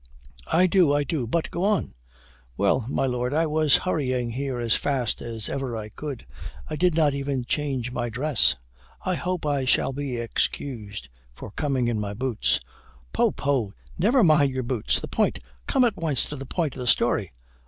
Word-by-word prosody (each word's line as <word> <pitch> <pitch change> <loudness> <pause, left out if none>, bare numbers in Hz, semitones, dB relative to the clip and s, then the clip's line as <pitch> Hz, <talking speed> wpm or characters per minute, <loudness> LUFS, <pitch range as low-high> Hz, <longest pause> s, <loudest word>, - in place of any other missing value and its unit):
"I 180 +3 +5
do, 180 -4 +4
I 145 0 +2
do 140 -4 -2
but 165 +7 -1
go 175 - -2
on." 205 - +1 0.6
"Well, 110 +4 +2
my 135 - +1
Lord, 125 +1 -1
I 165 +1 +3
was 155 -1 +4
hurrying 130 -8 0
here 135 +1 -3
as 120 -2 +1
fast 130 -5 0
as 115 -3 -2
ever 135 -4 -3
I 105 -1 -6
could 140 +1 -6 0.4
I 155 - -4
did 175 +2 +2
not 155 -3 +3
even 140 -2 -2
change 130 -3 -1
my 120 -1 -2
dress 130 - +2 0.5
I 185 - +1
hope 180 -1 -2
I 145 -2 +1
shall 130 - +2
be 135 -2 -3
excused 115 - -3 0.3
for 100 - -9
coming 135 -2 0
in 115 -2 0
my 105 -1 -3
boots?" 125 -1 +1 0.5
"Poh, - - +3
poh 130 -8 -1 0.2
never 230 +8 +4
mind 150 -5 +5
your 130 0 -2
boots: 120 -3 0
the - - -6
point - - +1 0.3
come 260 - +3
at 230 - 0
once 155 -5 0
to 150 - -4
the 135 -1 -7
point 160 -4 -1
of - - -8
the 125 - -4
story." - - +2
135 Hz, 185 wpm, -25 LUFS, 120-155 Hz, 0.6 s, I